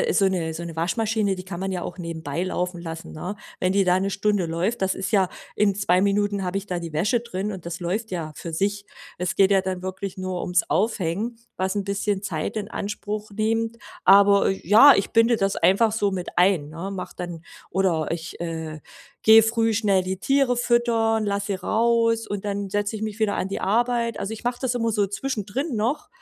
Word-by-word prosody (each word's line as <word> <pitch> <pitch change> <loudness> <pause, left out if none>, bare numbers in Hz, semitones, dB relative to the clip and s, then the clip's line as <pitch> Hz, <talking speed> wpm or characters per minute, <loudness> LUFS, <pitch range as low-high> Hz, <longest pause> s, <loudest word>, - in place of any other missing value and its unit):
äh 475 -3 +1
so 195 - +3
'ne 170 -4 -2
so 160 - -6
'ne, 170 -1 -7
Waschmaschine, 210 +3 0
die 185 - -6
kann 185 -2 -6
man 190 +1 -2
ja 180 - -2
auch 175 - -6
nebenbei 165 -3 -4
laufen 180 -1 -3
lassen, 165 -1 -7
ne? 180 +6 -5 0.2
Wenn 185 0 +2
die 195 0 +3
da 180 0 +3
'ne 195 +1 -1
Stunde 205 -1 +1
läuft, 175 +7 -1
das 190 0 +1
ist 190 - -4
ja 195 -5 +3 0.3
in 205 -2 +3
2 185 -2 +2
Minuten 200 0 +1
habe 180 +2 -1
ich 200 - -8
da 180 -3 -2
die 165 -2 -7
Wäsche 205 +10 +1
drin 210 -3 -4
und 190 -4 -7
das 170 +1 -5
läuft 205 +6 -2
ja 165 -4 -4
für 165 +6 -6
sich. 200 +4 -1 0.3
Es 180 0 -2
geht 195 0 +5
ja 195 -1 +4
dann 185 -1 -3
wirklich 190 +1 -5
nur 185 -1 -3
ums 180 0 +1
Aufhängen, 215 +2 -1 0.2
was 190 +1 -1
'n 200 - -1
bisschen 200 0 -1
Zeit 180 +2 -3
in 205 - -5
Anspruch 210 +1 -4
nehmt. 225 +2 -1 0.3
Aber, 200 0 +6
ja, 210 - +7
ich 195 - -1
binde 230 +1 +4
das 195 0 0
einfach 200 +6 +3
so 205 -2 +1
mit 185 -2 -4
ein, 180 -5 +3
ne? 165 +5 -6
Mache 195 -2 -6
dann 175 -2 -6 0.3
oder 175 -5 +1
ich, 165 0 -5
äh, 160 -2 -5 0.4
gehe 220 0 +8
früh 225 0 +1
schnell 200 -3 +2
die 185 +1 -3
Tiere 270 +1 +2
füttern, 230 -2 +2
lasse 200 0 -1
sie - - 0
raus, 230 +3 +1
und 205 -1 -4
dann 200 -1 -3
setze 205 +2 -1
ich 215 - -7
mich 215 -1 -4
wieder 215 -2 +1
an 190 - -2
die 195 - -4
Arbeit. 235 +1 +1
Also, 205 - -3
ich 225 - -12
mache 245 0 -1
das 255 -2 0
immer 230 -1 0
so 205 -1 +2
zwischendrin 235 - -3
noch, 235 +8 -1
200 Hz, 215 wpm, -24 LUFS, 180-220 Hz, 0.4 s, gehe